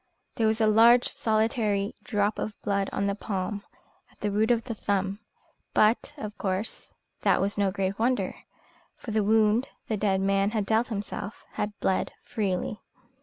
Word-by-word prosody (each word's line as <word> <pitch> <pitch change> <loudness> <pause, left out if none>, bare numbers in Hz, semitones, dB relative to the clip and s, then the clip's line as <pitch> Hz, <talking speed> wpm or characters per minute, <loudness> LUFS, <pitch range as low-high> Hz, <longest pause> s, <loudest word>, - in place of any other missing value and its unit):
There 225 - +1
was 220 +1 +1
a 220 - +4
large 230 +3 +6
solitary 215 -2 0
drop 205 -1 0
of 210 - -4
blood 200 -1 0
on 200 - -1
the 200 - +1
palm, 200 0 -3 0.5
at - - -28
the 210 - -1
root 215 +3 +2
of 235 -1 +3
the 235 - -4
thumb; 200 -1 -1 0.6
but, 225 +7 +3
of 215 -5 -6
course, 195 +2 -3 0.3
that - - +3
was 200 +1 0
no 200 -1 +2
great 195 +1 -2
wonder, 230 -5 +1 0.6
for 230 - -7
the 215 0 +2
wound 220 +3 +3 0.2
the 215 - 0
dead 195 -2 +1
man 195 +1 +2
had 205 - 0
dealt 220 +3 +2
himself 205 -1 -5
had 210 0 -4
bled 190 - 0
freely. 200 -1 -2
210 Hz, 170 wpm, -27 LUFS, 200-220 Hz, 0.6 s, large